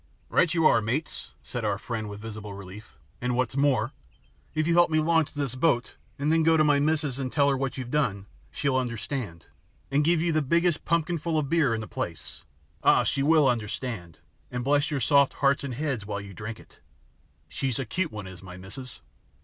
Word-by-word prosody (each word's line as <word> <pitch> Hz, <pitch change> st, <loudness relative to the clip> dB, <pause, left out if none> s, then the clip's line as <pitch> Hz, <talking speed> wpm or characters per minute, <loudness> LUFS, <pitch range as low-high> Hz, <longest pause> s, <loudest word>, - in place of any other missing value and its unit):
"Right 170 Hz, -, +3 dB
you 165 Hz, -2 st, +2 dB
are, 115 Hz, -, +6 dB
mates," 130 Hz, +9 st, -3 dB
said 120 Hz, -2 st, -5 dB
our 105 Hz, -2 st, 0 dB
friend 110 Hz, -1 st, -4 dB
with 105 Hz, 0 st, -8 dB
visible 105 Hz, -2 st, -7 dB
relief. 100 Hz, -2 st, -11 dB, 0.2 s
"And, 125 Hz, 0 st, 0 dB
what's 125 Hz, +1 st, 0 dB
more, 135 Hz, -3 st, +2 dB, 0.6 s
if 155 Hz, 0 st, +1 dB
you 170 Hz, -, +2 dB
help 175 Hz, 0 st, +5 dB
me 155 Hz, 0 st, +2 dB
launch 160 Hz, -1 st, +2 dB
this 140 Hz, -4 st, -2 dB
boat 130 Hz, -2 st, +1 dB, 0.2 s
and 145 Hz, +3 st, +1 dB
then 165 Hz, -, +4 dB
go 160 Hz, 0 st, +4 dB
to 155 Hz, -, +5 dB
my 145 Hz, -1 st, +4 dB
missus 150 Hz, -3 st, 0 dB
and 130 Hz, -2 st, -3 dB
tell 140 Hz, -2 st, +3 dB
her 140 Hz, -, +2 dB
what 135 Hz, -1 st, -2 dB
you've 125 Hz, -2 st, -5 dB
done, 100 Hz, -10 st, 0 dB, 0.2 s
she'll 140 Hz, -3 st, 0 dB
understand, 120 Hz, -, -3 dB, 0.5 s
and 145 Hz, +2 st, +3 dB
give 170 Hz, +2 st, +3 dB
you 170 Hz, +1 st, +1 dB
the 155 Hz, -, +2 dB
biggest 170 Hz, +3 st, +1 dB
pumpkinful 170 Hz, 0 st, 0 dB
of 145 Hz, -3 st, -1 dB
beer 150 Hz, -8 st, +3 dB
in 110 Hz, -, -3 dB
the 110 Hz, -, -7 dB
place. 80 Hz, -2 st, -5 dB, 0.4 s
Ah, -, -, +5 dB
she 135 Hz, -, 0 dB
will 155 Hz, 0 st, +5 dB
understand, 110 Hz, -6 st, -3 dB, 0.3 s
and 125 Hz, 0 st, -3 dB
bless 145 Hz, +3 st, +2 dB
your 145 Hz, -4 st, -2 dB
soft 140 Hz, +2 st, +4 dB
hearts 140 Hz, 0 st, +2 dB
and 130 Hz, -3 st, -4 dB
heads 135 Hz, -5 st, -2 dB
while 100 Hz, -1 st, -4 dB
you 100 Hz, -1 st, -9 dB
drink 105 Hz, +4 st, -6 dB
it -, -, -19 dB, 0.7 s
she's 130 Hz, -4 st, -2 dB
a 135 Hz, -, -2 dB
cute 170 Hz, +8 st, -2 dB
one 105 Hz, -2 st, -6 dB
is 95 Hz, -1 st, -10 dB
my 90 Hz, -1 st, -10 dB
missus." 105 Hz, +7 st, -9 dB
135 Hz, 205 wpm, -27 LUFS, 110-155 Hz, 0.7 s, are